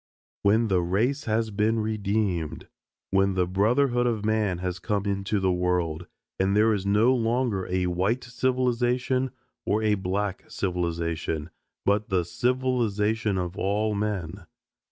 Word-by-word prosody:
"When 110 +3 +3
the 95 -2 +3
race 115 - 0
has 110 0 0
been 110 +2 +1
redeemed. 105 -6 -1 0.4
When 95 0 +2
the 90 -1 +2
brotherhood 120 +7 +2
of 110 -3 -1
man 110 -4 +1
has 90 0 -3
come 100 +1 -1
into 100 +1 -1
the 95 -1 +2
world; 90 -2 -1 0.3
and 95 +2 +2
there 110 +1 +4
is 100 -1 -2
no 105 +5 +4
longer 115 -4 0
a 90 0 0
white 95 +8 0
civilization 125 +1 0 0.3
or 105 +2 0
a 105 -1 +3
black 95 0 -2
civilization, 85 -3 -2 0.3
but 105 +1 +1
the 90 -3 +1
civilization 110 -2 0
of 90 0 -3
all 105 +2 0
men. 100 -4 -3
105 Hz, 135 wpm, -26 LUFS, 90-115 Hz, 0.4 s, there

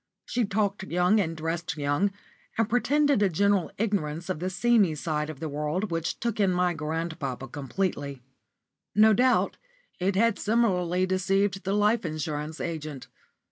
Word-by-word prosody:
She 240 -1 0
talked 205 -1 0
young 180 +4 +3
and 165 -4 -1
dressed 165 0 -3
young, 145 +7 +1 0.5
and 225 -2 +2
pretended 280 +2 +2
a 200 - +4
general 200 +1 +2
ignorance 175 -6 -1
of 185 - -2
the 180 +2 -2
seamy 200 -3 +3
side 150 0 -2
of 155 -4 -7
the 160 - -3
world 150 +7 -2
which 165 -1 -2
took 235 -2 -2
in 200 -2 +4
my 180 0 +2
grandpapa 155 -4 -4
completely. 140 -1 -3 0.7
No 215 +1 +7
doubt 250 +4 +2 0.4
it 190 +2 +1
had 230 +1 +2
similarly 185 -5 +2
deceived 195 +1 +1
the 195 - 0
life 210 +2 +3
insurance 155 -1 -4
agent. 155 -5 -5
180 Hz, 150 wpm, -27 LUFS, 155-205 Hz, 0.7 s, No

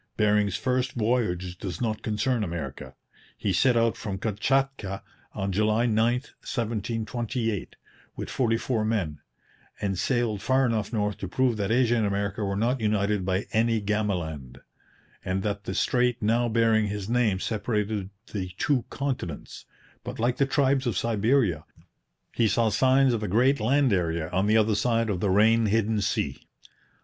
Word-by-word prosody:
Bering's 105 -2 +2
first 130 0 -1
voyage 105 -7 -1
does 90 -5 -5
not 110 -2 -2
concern 110 +2 0
America. 80 -7 -6 0.4
He 100 - -1
set 120 +6 +3
out 115 -1 +2
from 100 -3 -5
Kamchatka 110 0 -1 0.3
on 95 0 -2
July 110 +4 +2
9, 115 -3 +1 0.2
1728, 115 -2 -3 0.4
with - - -5
forty 115 -3 +1
four 115 -1 -1
men, 95 -9 -1 0.6
and 95 -3 -2
sailed 120 -5 0
far 130 +1 +2
enough 110 -4 -1
north 105 -3 -1
to 95 - -4
prove 125 +5 +1
that 100 -1 -1
Asia 120 0 +3
and 110 -2 +1
America 100 +1 -2
were 100 -1 -1
not 120 +5 0
united 105 -2 +1
by 95 +1 -1
any 115 0 +2
Gamaland, 85 -11 -3 0.6
and 95 +1 -2
that 105 -1 -3
the 95 - -4
strait 125 -1 +1
now 115 +3 +1
bearing 110 -1 +3
his 100 -1 -4
name 115 -5 +1
separated 105 -2 -2 0.2
the 95 -3 -3
two 135 -5 +1
continents; 130 - -5 0.4
but, - - -6
like 120 +2 0
the 140 - +2
tribes 135 -1 +2
of 110 -6 -1
Siberia, 110 - +1 0.7
he 115 - +2
saw 110 +2 +2
signs 130 +5 +3
of 115 - -1
a 105 - -2
great 125 +8 +3
land 130 +2 +2
area 85 -2 -1
on 95 +3 +1
the 110 +1 +4
other 110 0 +3
side 115 +1 +1
of 90 - -2
the 100 - 0
rain 110 +3 +4
hidden 110 0 +1
sea. 95 - -2
110 Hz, 160 wpm, -26 LUFS, 100-120 Hz, 0.7 s, the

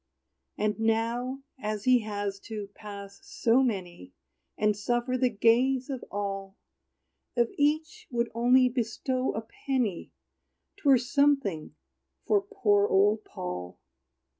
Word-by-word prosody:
And 210 0 0
now, 230 +4 0 0.2
as 210 -3 -3
he 255 -1 +5
has 205 -2 -4
to 210 -3 -6
pass 200 -2 -9
so 235 +3 +2
many, 180 - -3 0.4
And 210 0 +2
suffer 240 +4 -1
the 255 0 +2
gaze 245 +5 +2
of 260 -3 -5
all, 195 -1 -4 0.8
If 235 -2 +2
each 310 +9 0
would 235 -1 -1
only 250 +2 +5
bestow 250 +2 -1
a 220 - -2 0.3
penny, 245 -9 0 0.7
'Twere 280 -9 +5
something 250 - +1 0.5
for 205 -2 +3
poor 205 0 +2
old 205 +3 +3
Paul. 90 0 -6
225 Hz, 115 wpm, -28 LUFS, 205-255 Hz, 0.8 s, he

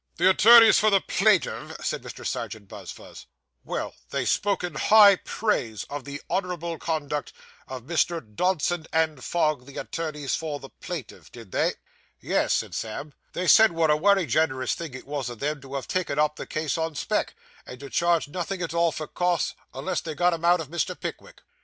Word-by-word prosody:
'The 185 +2 +5
attorneys 225 +3 +8
for 215 - +4
the 200 -2 +4
plaintiff,' 200 0 +1
said - - -1
Mr. - - -9
Serjeant 105 -3 -4
Buzfuz. 100 -4 -11 0.4
'Well! - - -4 0.2
They - - -2
spoke 200 -2 +1
in 175 -2 -3
high 200 +4 +7
praise 120 - -2
of 145 -2 -5
the 140 0 -6
honourable 175 -3 -3
conduct 150 -3 -3 0.3
of 130 -2 -7
Messrs. 170 +1 0
Dodson 175 - 0
and 160 -5 0
Fogg, 155 -6 0
the 140 - -11
attorneys 150 -4 -4
for 155 -3 -3
the 135 - -11
plaintiff, 170 -10 -8
did 115 -6 -12
they?' - - +1 0.4
'Yes,' - - +1
said - - -3
Sam, 125 +7 -5 0.2
'they 180 - -2
said 220 0 +7
what 165 -2 +2
a - - +5
wery 195 +3 +3
gen'rous 130 -1 +1
thing 160 -6 -6
it 130 - -9
was 140 -3 -3
o' 120 - -7
them 145 +4 -3
to 135 0 -9
have 135 - -4
taken 185 -6 -2
up 150 0 +2
the - - -7
case 155 +1 -2
on 160 -1 -2
spec, - - -1 0.3
and 125 - -9
to 140 - -7
charge 170 -3 +2
nothing 180 +4 -4
at 165 - -4
all 170 0 +2
for 155 - -5
costs, 175 +1 0 0.2
unless 190 - -3
they 160 -2 -6
got 175 +3 +3
'em 165 0 -5
out 175 +1 +4
of 155 -4 -6
Mr. 170 -2 -2
Pickwick. - - -8
160 Hz, 190 wpm, -25 LUFS, 140-180 Hz, 0.4 s, attorneys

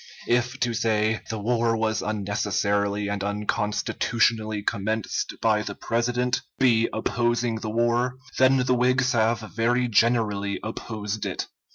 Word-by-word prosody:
If 120 +2 0
to 120 -1 +1
say 110 -1 +1
"the 110 - -3
war 115 +1 +1
was 110 0 0
unnecessarily 100 0 -1
and 100 -1 -2
unconstitutionally 105 +1 0
commenced 110 +1 -2
by 110 -1 +3
the 100 -1 -5
President" 125 +2 0 0.2
be 115 -4 +3
opposing 120 +1 0
the 110 0 -5
war, 120 +2 +1 0.2
then 130 +1 +5
the 125 - +3
Whigs 125 +1 +2
have 115 -2 +2
very 115 +3 0
generally 105 -3 +1
opposed 110 -1 -4
it. - - -3
110 Hz, 130 wpm, -25 LUFS, 105-120 Hz, 0.2 s, then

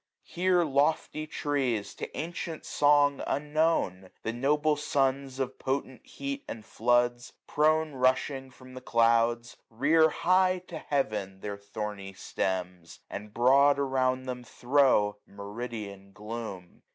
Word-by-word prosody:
Here 180 0 +2
lofty 155 +1 0
trees, 135 -9 -1
to - - -7
ancient 165 0 -5
song 145 -1 +3
unknown. 150 - 0
The 115 - -2
noble 150 +5 +2
sons 135 -2 0
of 130 -1 -3
potent 130 -1 -3
heat 280 0 -6
and 110 -2 -7
floods. 120 +1 +1
Prone 155 +1 +2
rushing 130 +1 0
from 130 0 -15
the 130 - -8
clouds, 115 0 +2
rear 155 +7 +4
high 185 +2 +2
to 165 -3 -6
Heaven 105 -11 -2
Their 105 -1 -4
thorny 100 -1 -6
stems; 90 -3 -4
and 105 +1 -7
broad 135 +5 +5
around 130 -2 0
them 125 -1 -5
throw 120 -6 +2
Meridian 100 -1 -7
gloom. 105 -4 -7
130 Hz, 120 wpm, -29 LUFS, 110-145 Hz, -, broad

